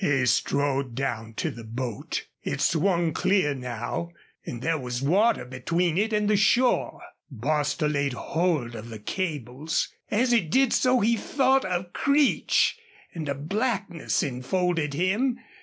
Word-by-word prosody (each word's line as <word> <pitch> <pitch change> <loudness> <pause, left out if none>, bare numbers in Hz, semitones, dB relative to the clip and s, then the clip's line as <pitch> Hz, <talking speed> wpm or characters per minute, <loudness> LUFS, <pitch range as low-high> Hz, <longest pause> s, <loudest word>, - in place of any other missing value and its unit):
He 135 -6 +2
strode 135 +1 +1
down 115 -4 -3
to - - -1
the 115 - -10
boat. 115 0 -4 0.2
It - - -3
swung 170 -1 +2
clear 190 -7 +2
now, 125 +5 -4 0.3
and 120 0 -6
there 165 -1 +1
was 125 0 -4
water 200 - +3
between 160 +7 -1
it 215 +4 +1
and 210 -1 +1
the 210 - +3
shore. 240 +5 +2 0.3
Bostil 150 +4 0
laid 140 -2 0
hold 155 -3 -1
of 115 0 -8
the 110 - -7
cables. 150 - -2 0.2
As 245 +4 +2
he 235 -2 +5
did 240 +10 +2
so 255 -1 +3
he 230 +3 +3
thought 265 +3 +2
of 180 -1 -3
Creech 280 0 +2 0.3
and 155 -4 -5
a 140 - 0
blackness 195 - -1
enfolded 150 +3 -1
him. 210 - +1
160 Hz, 145 wpm, -26 LUFS, 130-200 Hz, 0.3 s, he